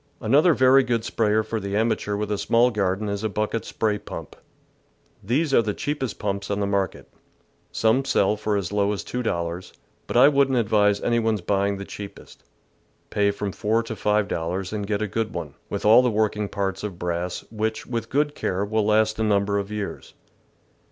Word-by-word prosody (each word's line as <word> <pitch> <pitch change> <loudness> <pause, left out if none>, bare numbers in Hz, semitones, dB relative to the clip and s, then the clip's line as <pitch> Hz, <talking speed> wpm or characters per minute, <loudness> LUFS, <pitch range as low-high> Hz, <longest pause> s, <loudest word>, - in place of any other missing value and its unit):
Another 145 +8 +4
very 130 +1 +6
good 120 -3 -1
sprayer 110 -1 +1
for 110 +1 -3
the 100 0 -4
amateur 110 -2 0
with 105 0 -3
a 105 - 0
small 120 +2 +3
garden 100 -1 -1
is 100 +1 -3
a 110 - 0
bucket 105 +2 -2
spray 105 -2 -1
pump. - - -8 0.9
These 135 +7 0
are - - +6
the 105 -2 -3
cheapest 145 -6 -3
pumps 100 -1 -3
on 100 0 -1
the 100 - 0
market. 100 -2 -2 0.6
Some 115 +4 +2
sell 105 -5 +2
for 105 -1 -1
as 95 -2 -3
low 100 0 +1
as 100 - -4
two 125 - -4
dollars, 85 -4 -3 0.3
but - - -1
I 125 - +8
wouldn't 140 -2 +3
advise 105 -3 +2
any 120 0 +1
one's 110 -3 0
buying 100 +2 0
the 100 - -6
cheapest. 100 0 -10 0.7
Pay 100 -1 +2
from 100 0 -3
four 110 +4 0
to 115 -1 -6
five 105 -1 +1
dollars, 90 +4 -3
and 105 -2 -3
get 105 0 -1
a - - -1
good 110 +2 -3
one, - - -5 0.2
with - - -4
all 110 +4 +8
the 125 - +2
working 105 -2 0
parts 95 -1 -3
of 100 -5 -5
brass, 90 +1 -3
which, 110 0 -2
with 115 -2 -4
good 145 +1 +1
care, 95 -7 -2
will 110 +1 0
last 110 0 +2
a - - +1
number 100 -1 +1
of 100 0 -5
years. 105 -1 -6
105 Hz, 200 wpm, -24 LUFS, 100-115 Hz, 0.9 s, I